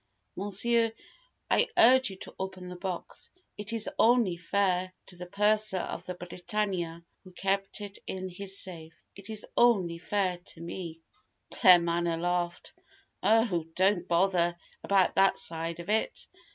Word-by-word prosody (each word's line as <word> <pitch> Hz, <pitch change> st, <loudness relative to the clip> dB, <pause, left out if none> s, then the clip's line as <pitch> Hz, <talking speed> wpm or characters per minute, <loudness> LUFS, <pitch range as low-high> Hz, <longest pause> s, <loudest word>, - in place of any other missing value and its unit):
Monsieur, 225 Hz, +3 st, +1 dB, 0.6 s
I -, -, +3 dB
urge 260 Hz, +1 st, +6 dB
you 195 Hz, -, -8 dB
to -, -, -8 dB
open 190 Hz, -1 st, -6 dB
the 180 Hz, -, -7 dB
box. 180 Hz, -1 st, -5 dB, 0.3 s
It 210 Hz, +1 st, -3 dB
is 225 Hz, -2 st, +1 dB
only 230 Hz, -6 st, +4 dB
fair 185 Hz, +1 st, 0 dB
to 185 Hz, -, -5 dB
the 180 Hz, 0 st, -8 dB
Purser 210 Hz, +1 st, +2 dB
of 175 Hz, 0 st, -5 dB
the 180 Hz, -, -4 dB
Britannia, 175 Hz, -2 st, -3 dB, 0.2 s
who 185 Hz, -, -14 dB
kept 195 Hz, +2 st, -1 dB
it 205 Hz, -1 st, -6 dB
in 185 Hz, 0 st, -4 dB
his 195 Hz, +2 st, -4 dB
safe. 165 Hz, -3 st, -7 dB, 0.2 s
It 200 Hz, +2 st, -10 dB
is 215 Hz, -1 st, -1 dB
only 190 Hz, -9 st, +3 dB
fair 185 Hz, -1 st, -1 dB
to 175 Hz, -, -7 dB
me 170 Hz, -1 st, -7 dB, 0.3 s
" -, -, -46 dB
Claremanagh 170 Hz, -2 st, +4 dB
laughed. 175 Hz, 0 st, -2 dB, 0.5 s
"Oh, 205 Hz, -5 st, +2 dB
don't 185 Hz, -1 st, +2 dB
bother 175 Hz, -1 st, +2 dB, 0.3 s
about 195 Hz, -2 st, +2 dB
that 195 Hz, 0 st, +5 dB
side 165 Hz, 0 st, -2 dB
of 170 Hz, -, -8 dB
it! 220 Hz, -, 0 dB
185 Hz, 150 wpm, -29 LUFS, 175-205 Hz, 0.6 s, urge